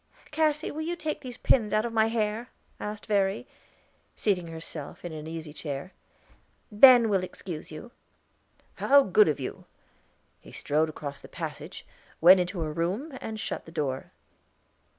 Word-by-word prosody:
"Cassy, 305 0 +1
will 310 - -5
you 340 +2 -2
take 310 -2 -3
these 250 -3 -8
pins 220 -5 +2
out 215 +2 +2
of 235 - -4
my 220 -1 +4
hair?" 225 +1 -1 0.3
asked 210 0 -5
Verry, 200 +2 0 0.7
seating 185 -5 0
herself 160 -1 -6
in 175 - -4
an 155 0 -7
easy 160 -2 -6
chair. 145 +3 -6 0.8
"Ben, 245 +3 +9
we 225 - +1
will 185 - +1
excuse 175 -4 -7
you." 155 +10 -9 0.9
"How 280 0 +6
good 205 +1 +5
of 150 -2 0
you." 130 - -6 0.7
He - - -15
strode 155 +2 0
across 140 -2 -7
the - - -11
passage, - - -7 0.3
went 180 +3 +8
into 180 0 -2
her 155 -1 -2
room, 200 - -2
and 220 -1 -5
shut 180 - -4
the 165 - -12
door. 145 -5 -3
195 Hz, 160 wpm, -28 LUFS, 160-235 Hz, 0.9 s, Ben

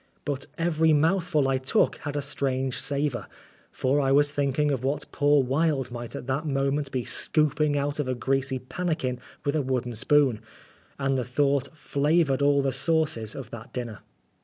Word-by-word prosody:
But 140 -2 -3
every 160 -1 +2
mouthful 160 -1 +2
I 135 -1 +1
took 130 - +2
had 145 -1 -6
a 145 - -1
strange 135 -2 -1
savour, 140 -6 -1 0.4
for 140 +3 +1
I 135 -1 +1
was 145 +1 +4
thinking 145 +1 +1
of 130 -3 -2
what 140 +2 -1
poor 145 -2 +3
Wilde 135 -1 0
might 120 -1 -7
at - - -6
that 135 +5 -2
moment 135 0 0
be 125 -3 -2
scooping 150 -1 +2
out 145 +1 -2
of 145 - -1
a 130 - -1
greasy 135 +1 0
pan 130 +8 -5
nikin 130 -7 -1 0.3
with 145 +1 0
a 155 - +2
wooden 125 -2 -2
spoon, 130 0 +2 0.6
and 135 -1 0
the - - -1
thought 140 +2 +1
flavoured 145 -1 +1
all 140 -1 +3
the 135 - +1
sauces 155 -10 +1
of 130 -5 -8
that 115 +1 -10
dinner. 120 -5 -5
140 Hz, 180 wpm, -26 LUFS, 130-150 Hz, 0.6 s, was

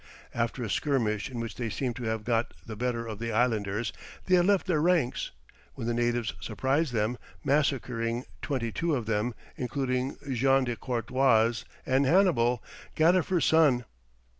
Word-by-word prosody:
After 120 +2 -1
a 110 - -3
skirmish, 115 -7 0
in 125 -2 -6
which 115 -2 -4
they 120 -2 -2
seemed 125 +2 -2
to 120 - -5
have 110 -1 -2
got 115 0 0
the 110 - -6
better 120 +1 -2
of 110 -2 -6
the 115 0 -3
islanders, 110 -2 0 0.3
they 185 - +1
had 180 0 +5
left 200 -2 +3
their 170 -5 +1
ranks, 165 -7 +1 0.5
when - - -5
the 120 - 0
natives 120 -1 0
surprised 135 - 0
them, 115 +1 0 0.2
massacring 130 -5 0 0.2
twenty 125 -6 -2
two 165 +2 0
of 120 -4 -2
them, 110 +2 -1 0.2
including 130 0 -2
Jean 135 +2 +3
de 120 -2 -2
Courtois 120 -1 +2 0.2
and 135 +1 +2
Hannibal, 130 - +3 0.3
Gadifer's 175 +1 +3
son. 145 -7 +4
125 Hz, 160 wpm, -28 LUFS, 115-140 Hz, 0.5 s, had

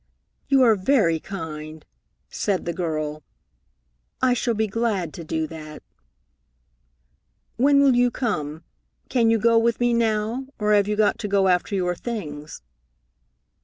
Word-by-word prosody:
"You 275 -2 +4
are 230 -3 +6
very 190 -5 +2
kind," 155 -4 -7 0.4
said 195 -3 -2
the 170 - -2
girl. 155 -3 -3 1.0
"I 255 -1 +3
shall 235 -1 -1
be 220 +1 +1
glad 205 -6 -2
to 170 - -8
do 160 0 -2
that." 155 -1 -10 1.7
"When 280 +3 +4
will 275 -2 +5
you 245 0 +4
come? 160 - -3 0.5
Can 235 -3 +2
you 225 - +4
go 230 +1 +4
with 230 0 +1
me 240 0 +2
now, 230 +2 0
or 210 -1 +1
have 205 -1 +3
you 210 - 0
got 210 0 +2
to 210 - -3
go 195 -1 +2
after 180 +3 +1
your 180 -2 0
things?" 155 -8 -7
205 Hz, 145 wpm, -23 LUFS, 165-235 Hz, 1.7 s, are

